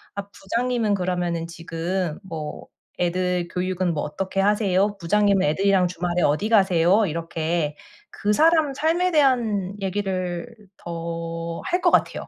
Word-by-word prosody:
아 200 0 -5
"부장님은 230 +2 -1
그러면은 180 -3 -1
지금 170 0 -3
뭐 160 -5 -7 0.3
애들 180 0 0
교육은 180 -1 -1
뭐 150 - -2
어떻게 190 +5 -3
하세요? 205 0 +2
부장님은 200 +2 +2
애들이랑 190 +3 +3
주말에 175 0 -2
어디 155 +8 +2
가세요?" 190 -1 +4
이렇게 165 -2 -2 0.4
그 210 - -1
사람 315 +1 +4
삶에 335 +5 +1
대한 235 - +2
얘기를 185 -1 -2 0.3
더 165 0 -5
할 360 0 0
것 350 - +4
같아요. - - +1
185 Hz, 290 characters per minute, -23 LUFS, 170-205 Hz, 0.4 s, 가세요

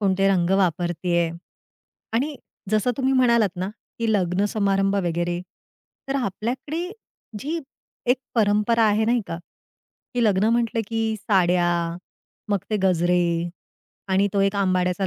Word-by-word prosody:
कोणते 195 -1 +2
रंग 180 -2 +2
वापरत 175 -1 +1
आहे? 170 -1 +2 0.8
आणि 275 +5 0 0.3
जसं 215 +3 +2
तुम्ही 265 0 +1
म्हणालात 235 -7 +3
ना, 185 +2 -2 0.3
की 225 -1 +1
लग्न 185 0 +1
समारंभ 195 -1 +1
वगैरे, 175 +1 -1 0.7
तर 275 - 0
आपल्याकडे 260 - -3 0.5
जी 315 +8 -3 0.5
एक 250 - +3 0.2
परंपरा 215 +1 +3
आहे 215 +1 +3
नाही 240 +1 +2
का, 165 - -4 0.8
की 240 -1 +2
लग्न 205 +1 +3
म्हंटलं 230 -1 +1
की 225 -1 -1 0.2
साड्या, 180 -3 +3 0.8
मग 200 -1 +2
ते 215 - +2
गजरे 180 -1 +3 0.9
आणि 195 +1 +3
तो 200 - +2
एक 195 +1 +1
आंबाड्याचा 185 -1 +1
200 Hz, 130 wpm, -23 LUFS, 180-230 Hz, 0.9 s, म्हणालात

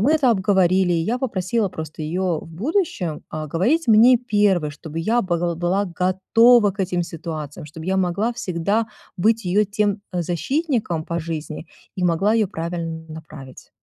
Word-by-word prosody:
мы 275 +9 +3
это 280 -6 +3
обговорили, 190 -3 +3
и 165 -1 +1
я 240 +5 -1
попросила 210 -3 -1
просто 160 -3 -8
её 175 +1 -1
в - - -12
будущем, 200 - -2
а 155 0 -4
говорить 245 - +1
мне 230 +3 +7
1, 205 -9 +1
чтобы 155 +2 -7
я 225 +8 +2
был 175 -2 -1
была 180 +4 0
готова 195 +6 +4
к 205 - -23
этим 180 -2 0
ситуациям, 160 -2 -6
чтобы 160 +3 -9
я 190 0 +1
могла 190 +5 0
всегда 200 +1 -1 0.3
быть 220 +4 +2
её 200 +4 +2
тем 205 0 -1
защитником 180 - -1
по 170 0 -3
жизни 155 0 -6 0.3
и 180 - -1
могла 180 +6 +2
её 220 -3 +3
правильно 165 -2 -4
направить. 155 -4 -11
185 Hz, 160 wpm, -22 LUFS, 165-215 Hz, 0.3 s, мне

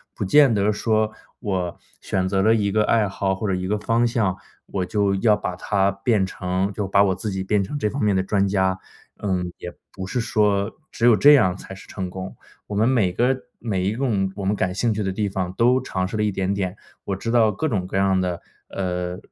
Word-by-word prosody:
不 - - -3
见 140 +5 +5
得 105 0 +2
说， 110 0 +1 0.3
我 95 -6 -2 0.2
选 95 -1 -1
择 95 0 +1
了 110 +3 +4
一 100 -2 0
个 105 +1 +2
爱 110 -3 +2
好 95 0 -1
或 100 - -5
者 - - +1
一 90 0 -2
个 105 +2 0
方 115 +3 +1
向， 110 -6 0 0.3
我 95 -2 -2
就 100 +1 +1
要 105 +2 +3
把 100 -3 -4
它 100 +1 +1
变 100 0 +1
成 95 +1 -2
就 100 -1 -3
把 100 +1 +4
我 95 -2 +2
自 100 +3 -4
己 95 -1 -3
变 105 +1 +1
成 100 +10 -4
这 105 -7 0
方 140 +6 -4
面 105 -2 +2
的 95 - +1
专 100 0 +1
家。 95 -1 +1 0.4
嗯， 90 -3 -2
也 90 - -7 0.2
不 95 - -6
是 110 +6 -2
说 105 -2 +1 0.2
只 - - -7
有 120 - +7
这 145 +5 +8
样 95 -10 +4
才 95 - -10
是 95 - -12
成 95 -2 -5
功。 95 +1 -7 0.3
我 105 - -5
们 110 +3 +3
每 115 -9 +2
个 125 +8 +2 0.2
每 100 -6 -2
一个 105 -2 0
我 100 - -5
们 100 +2 +1
感 90 -2 -1
兴 115 +2 +1
趣 105 - -3
的 95 -2 -1
地 105 +2 -1
方， 95 -2 -3
都 125 +2 +4
尝 95 0 -2
试 95 - -6
了 - - 0
一 105 -1 +1
点 95 +1 -1
点。 95 -1 -3 0.3
我 100 - -2
知 115 +4 -4
道 115 -3 +4
各 105 +10 -2
种 95 -9 -1
各 95 - -3
样 95 -1 +2
的， 90 -2 -2 0.3
呃， 90 -1 -3
100 Hz, 255 characters per minute, -23 LUFS, 95-110 Hz, 0.4 s, 这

